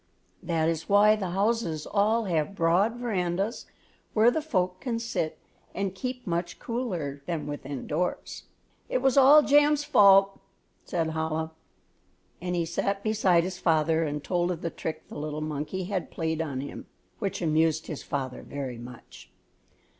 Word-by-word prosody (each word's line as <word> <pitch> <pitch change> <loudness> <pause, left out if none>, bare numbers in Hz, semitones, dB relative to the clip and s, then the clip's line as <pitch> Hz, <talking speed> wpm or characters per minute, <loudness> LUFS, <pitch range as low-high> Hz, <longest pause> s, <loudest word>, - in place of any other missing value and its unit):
That 165 -2 0
is 165 -1 -2
why 205 +1 +6
the 195 -4 -3
houses 195 -5 0
all 215 +3 +2
have 175 -1 -1
broad 185 +6 +2
verandas, 200 -3 -2 0.5
where 225 +2 +6
the 315 - -1
folk 185 -11 -1
can 240 -3 -2
sit 230 -9 -2 0.4
and 195 -2 -2
keep 250 +6 -5
much 170 0 -2
cooler 175 - -4
than 165 -4 -2
within 145 -2 -6
doors. 175 +4 -3 0.4
"It - - 0
was 265 -2 +3
all 285 +2 +8
Jam's 290 +1 +4
fault," 195 -8 +5 0.5
said 165 -2 -1
Chola, 160 0 -2 0.9
and 180 0 -2
he 170 -1 0
sat 195 +4 -2
beside 195 -6 +3
his 180 0 -5
father 160 -1 +2
and 150 -1 -3
told 175 -1 0
of 175 -3 -4
the 165 - -2
trick 160 - -6
the - - -8
little 150 0 -4
monkey 155 +5 -3
had 185 -3 -3
played 160 -1 -2
him, 140 -3 -5 0.3
which 200 -4 -2
amused 160 -1 +1
his 155 - -6
father 130 -3 -4
very 130 -4 -6
much. 120 0 -12
175 Hz, 155 wpm, -27 LUFS, 160-210 Hz, 0.9 s, all